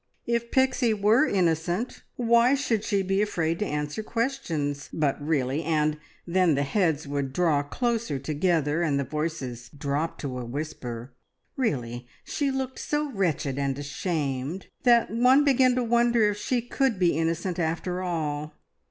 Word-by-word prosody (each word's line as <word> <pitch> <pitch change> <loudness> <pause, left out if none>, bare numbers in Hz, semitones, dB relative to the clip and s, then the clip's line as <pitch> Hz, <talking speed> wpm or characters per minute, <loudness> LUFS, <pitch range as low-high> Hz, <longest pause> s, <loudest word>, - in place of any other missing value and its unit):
If 235 0 -1
Pixie 260 -3 +2
were 215 +8 +4
innocent, 175 +4 0
why 235 +2 +4
should 245 -7 0
she 200 -3 +1
be 195 +1 +1
afraid 170 -5 0
to 210 - -1
answer 150 +5 -3
questions? 175 - -2
But, 145 -2 0
really 145 -1 0
and 155 -1 +1 0.3
then 180 -3 +3
the 140 - +1
heads 160 -1 0
would 140 -1 -2
draw 160 -3 +2
close 230 - -1
together, 150 +2 0
and 145 -5 +1
the - - 0
voices 135 -4 -4
drop 145 +2 -2
to 130 -3 -4
a - - -4
whisper 125 -2 -6 0.4
really 125 - -2 0.2
she 285 -2 -1
looked 265 -1 -3
so 295 -1 -1
wretched 155 - -1
and 140 -1 -1
ashamed, 145 +1 -3 0.2
that 235 -1 +5
one 250 +5 +5
began 260 -3 +4
to 250 - +1
wonder 235 -2 +3
if 205 - -5
she 240 +3 -1
could 255 -2 0
be 175 -4 +3
innocent 165 +3 -1
after 175 +2 -1
all! 155 -4 -3
170 Hz, 150 wpm, -26 LUFS, 145-230 Hz, 0.4 s, that